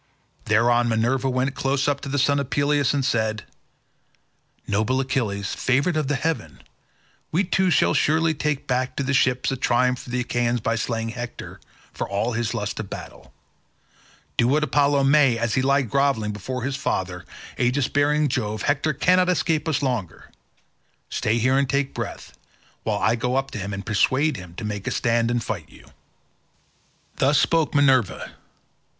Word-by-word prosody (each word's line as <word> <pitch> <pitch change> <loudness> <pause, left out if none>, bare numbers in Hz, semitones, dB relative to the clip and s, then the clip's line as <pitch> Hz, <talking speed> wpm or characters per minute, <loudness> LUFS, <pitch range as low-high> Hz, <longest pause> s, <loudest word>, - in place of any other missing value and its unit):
Thereon 120 +2 +3
Minerva 120 +4 +1
went 130 +1 0
close 135 0 0
up 145 -1 0
to 140 - -6
the 145 - -1
son 140 +1 +2
of 140 -2 -4
Peleus 145 -1 +2
and 140 -2 0
said, 110 -4 0 1.2
"Noble 110 +6 0
Achilles, 110 -7 -2
favoured 140 +7 +1
of 150 -3 -1
heaven, 150 +3 -2 0.7
we 175 +5 +2
two 190 0 +1
shall 175 - +3
surely 160 +1 +2
take 150 -2 -2
back 125 0 -1
to 140 - -2
the 140 +1 -1
ships 125 -1 +2
a - - -1
triumph 125 0 +1
for 130 - -11
the 125 +1 -1
Achaeans 120 0 0
by 115 +1 -1
slaying 115 0 -2
Hector, 120 +1 -7 0.3
for - - -4
all 105 +5 -1
his 115 -1 -2
lust 105 0 -3
of 105 -3 -5
battle. - - -9 1.1
Do 115 - +3
what 150 +4 +2
Apollo 145 0 +2
may 135 -3 +4
as 115 -1 -1
he 130 - +2
lies 140 0 +2
grovelling 125 -3 +1
before 120 +5 -5
his 135 +1 -2
father, 90 -9 -3 0.4
aegis 125 +2 +1
bearing 150 +1 +2
Jove, 110 -5 -2
Hector 145 +2 +1
cannot 180 +5 +3
escape 165 -3 0
us 145 -2 0
longer. 120 - -3 0.8
Stay 110 +2 0
here 130 +3 +2
and 140 -1 0
take 140 0 0
breath, - - -6 0.5
while - - -1
I 115 - +2
go 125 +2 -1
up 135 0 -1
to 110 - -5
him 100 +1 -4
and 100 0 -5
persuade 130 +8 +2
him 90 -2 -10
to 110 - -6
make 105 -1 -5
a - - 0
stand 115 -1 +1
and 120 -1 0
fight 90 -8 -5
you." - - -17 1.3
Thus 140 +2 +3
spoke 160 0 +2
Minerva. 135 -7 +2
130 Hz, 170 wpm, -23 LUFS, 115-140 Hz, 1.3 s, may